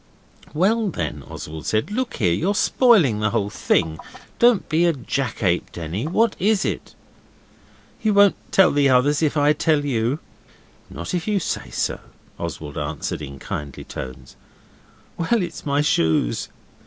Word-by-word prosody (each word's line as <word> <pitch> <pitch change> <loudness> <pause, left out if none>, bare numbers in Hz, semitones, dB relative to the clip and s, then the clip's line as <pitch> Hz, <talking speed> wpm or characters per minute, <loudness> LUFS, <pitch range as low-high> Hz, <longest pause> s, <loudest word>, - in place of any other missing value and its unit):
'Well, 215 +7 +2
then,' 85 - -4
Oswald 80 0 -8
said, 110 - 0
'look 255 +3 -2
here, 90 -9 +2
you're 190 - 0
spoiling 200 - +4
the 110 0 +1
whole 105 -2 -1
thing. 80 -6 0 0.4
Don't 240 -4 +4
be 160 +3 +2
a 170 - +3
jackape, 115 - -1
Denny. 85 - -4
What 220 +6 +2
is 205 +1 +2
it?' - - -4 1.1
'You 215 -2 +1
won't 200 -1 +6 0.2
tell 190 -2 +5
the 145 -1 +3
others 135 +4 +3
if 155 -1 +1
I 145 +1 +4
tell 150 -1 +1
you?' 120 0 0 0.7
'Not 85 - -6
if 175 0 -2
you 210 -2 +2
say - - -4 0.2
not,' - - -11 0.4
Oswald 75 -2 -5
answered 75 +1 -4
in 70 -2 -7
kindly 70 0 -6
tones. 65 0 -8 0.8
'Well, 190 +5 +1
it's 170 -3 -7
my 140 +1 +2
shoes. 80 - +1
145 Hz, 150 wpm, -22 LUFS, -, 1.1 s, won't